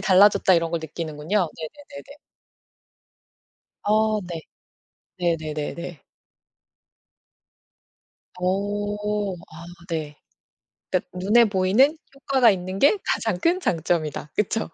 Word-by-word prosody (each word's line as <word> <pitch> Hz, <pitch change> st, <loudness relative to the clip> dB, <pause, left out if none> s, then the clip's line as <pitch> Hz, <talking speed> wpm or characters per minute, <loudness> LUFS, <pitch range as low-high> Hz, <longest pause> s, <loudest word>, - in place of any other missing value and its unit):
달라졌다 195 Hz, 0 st, +5 dB
이런 165 Hz, -1 st, +1 dB
걸 170 Hz, -, 0 dB
느끼는군요. 160 Hz, +4 st, -2 dB
네네네네. 280 Hz, -, -10 dB, 1.7 s
어 215 Hz, 0 st, +2 dB
네. 175 Hz, -2 st, -6 dB, 0.8 s
네네네네. 165 Hz, -1 st, -3 dB, 2.4 s
어. 205 Hz, +2 st, -1 dB
아 165 Hz, -1 st, -12 dB, 0.2 s
네. 155 Hz, -3 st, -4 dB, 0.7 s
그러니까 -, -, -1 dB
눈에 210 Hz, +6 st, +5 dB
보이는 210 Hz, +9 st, +3 dB, 0.2 s
효과가 270 Hz, -3 st, +3 dB
있는 185 Hz, 0 st, -3 dB
게 285 Hz, -, +5 dB
가장 220 Hz, -6 st, 0 dB
큰 345 Hz, -, +2 dB
장점이다. 160 Hz, -, -1 dB
그쵸. 210 Hz, -1 st, 0 dB
185 Hz, 200 characters per minute, -24 LUFS, 165-215 Hz, 2.4 s, 달라졌다